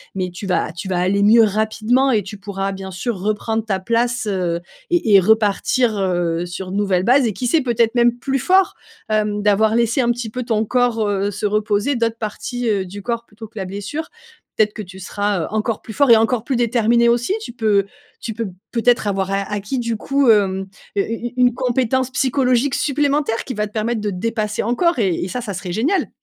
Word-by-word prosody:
mais 185 -1 -2
tu 185 +3 -7
vas 175 -4 0
tu 175 +3 -7
vas 185 -2 -1
aller 190 +3 +1
mieux 225 +3 +6
rapidement 220 +5 +1
et 215 -4 +2
tu 205 +3 -8
pourras 195 -1 -4
bien 190 0 -7
sûr 195 +5 -3
reprendre 215 +2 -1
ta 195 -4 -1
place, 235 +3 0
heu 180 -4 -1 0.3
et-et 225 - +4
repartir, 220 +3 +2
heu, 175 -3 0
sur 180 +1 -6
une 190 - -3
nouvelle 195 -3 +1
base 255 +5 +4
et 215 - -2
qui 245 +6 -3
sait 310 +6 +3
peut-être 235 -2 +1
même 240 0 +3
plus 270 +2 -1
fort, 375 +8 +3 0.3
hem, 210 -1 0
d'avoir 210 +2 +3
laissé 235 +3 +1
un 240 - +1
petit 240 -1 -4
peu 250 +3 -4
ton 220 -2 0
corps, 240 -1 +1
heu, 200 0 0
se 210 +1 -4
reposer, 210 +5 +1
d'autres 230 -1 0
parties, 235 +2 -4
heu, 200 -3 0
du 200 +3 -8
corps 235 +2 -3
plutôt 215 +1 -11
que 220 - -18
la 190 - -3
blessure. 205 - -5 0.5
Peut-être 210 -1 +2
que - - -6
tu 190 -1 -10
seras, 205 0 -2
heu, 160 - -3
encore 215 +1 -2
plus 220 - -9
fort 280 +3 +3
et - - +10
encore 225 +1 +1
plus 270 - -1
déterminé 235 0 +3
aussi. 240 +9 +1
Tu - - -7
peux 215 -4 +1 0.4
tu 225 - -4
peux 225 0 -3 0.2
peut-être 240 -2 +2
avoir 195 -1 -1
a 195 0 +1
acquis 205 +5 -2
du 230 -2 -2
coup, 275 +3 +1
hem, 195 -3 +3 0.3
heu, - - +4
u 225 - -3
u - - -8
une 250 -1 +4
compétence 255 +1 0
psychologique 265 0 +1
supplémentaire 285 -4 0
qui 260 - -5
va 210 -1 -2
te 210 - -20
permettre 225 +1 -1
de 210 - -1
te - - -5
dépasser 215 +1 -2
encore 285 +9 +1
et 195 -5 +2
et - - -3
ça, 220 +7 -4
ça 215 -4 -5
serait 180 -1 -5
génial! 295 - 0
220 Hz, 220 wpm, -19 LUFS, 200-245 Hz, 0.5 s, et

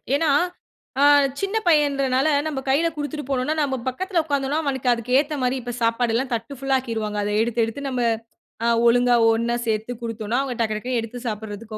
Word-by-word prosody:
ஏன்னா 315 +1 +1 0.7
அ - - +5 0.4
சின்ன 395 +2 -1
பையன்றனால, 275 -3 +3 0.2
நம்ம 295 -3 -3
கையில 300 +5 +3
கொடுத்துட்டு 295 0 -4
போனோன்னா, 265 +3 0
நம்ம 275 -2 0
பக்கத்துல 350 +7 0
உக்காந்தோன்னா 285 0 0
அவனுக்கு 265 -3 -1
அதுக்கு 235 +2 -1
ஏத்தமாரி 275 -3 -1
இப்ப 245 0 -5
சாப்பாடுல்லாம் 235 +2 +1
தட்டு 230 +4 -6
ஃபுல்லா 270 0 +1
ஆக்கிருவாங்க. 220 -4 -4
அத 205 - -2
எடுத்து, 235 0 0
எடுத்து 225 +5 -6
நம்ம 255 -2 -2 0.6
அ - - +3 0.2
ஒழுங்கா 245 +1 +4 0.2
ஒன்னா 235 +1 0
சேர்த்து 220 +2 -1
கொடுத்தோன்னா, 225 0 -3
அவுங்க 265 -3 -3
டக்டக்ன்னு 225 +3 -2
எடுத்து 230 +2 -7
சாப்பிடுறதுக்கு 215 0 -6
250 Hz, 165 wpm, -23 LUFS, 230-280 Hz, 0.7 s, அ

